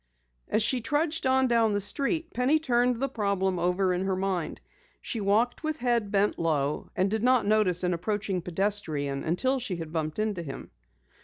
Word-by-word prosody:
As 215 - +1
she 250 +2 +1
trudged 295 +5 0
on 260 0 +3
down 230 -3 +3
the 205 - +1
street 300 - -1
Penny 255 +6 +3
turned 245 -5 +1
the 275 - 0
problem 200 -6 -1
over 180 +2 +1
in 180 +2 -1
her 190 -1 0
mind. 185 -4 -2 0.4
She 225 - -4
walked 215 +5 +1
with 310 0 -2
head 240 -5 0
bent 205 0 +1
low 150 -3 -1
and 190 +1 +1
did 220 -1 0
not 250 -1 +3
notice 205 -4 +2
an 180 0 +1
approaching 195 +1 -2
pedestrian 165 -7 -1
until 255 +11 0
she 220 -7 -3
had 165 -2 -7
bumped 155 -2 -2
into 215 -4 -1
him. 140 -5 -8
205 Hz, 180 wpm, -27 LUFS, 180-245 Hz, 0.4 s, on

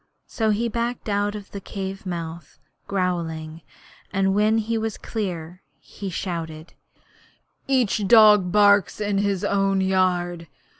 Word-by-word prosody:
So 220 -1 -1
he 220 +3 +1
backed 235 0 -3
out 205 +1 0
of 205 -2 -9
the 200 - -7
cave 195 0 -6
mouth 170 -3 -6 0.3
growling, 165 -4 -2 0.5
and 195 -1 +1
when 210 +2 +3
he 225 +1 -1
was 220 -1 -2
clear 180 -5 -5 0.2
he 200 - -8
shouted: 165 -3 -5 0.9
'Each 240 -6 +1
dog 210 -4 +6
barks 205 0 +4
in 205 -1 0
his 200 -2 0
own 195 -1 +1
yard! 180 -3 0
195 Hz, 130 wpm, -23 LUFS, 175-210 Hz, 0.9 s, dog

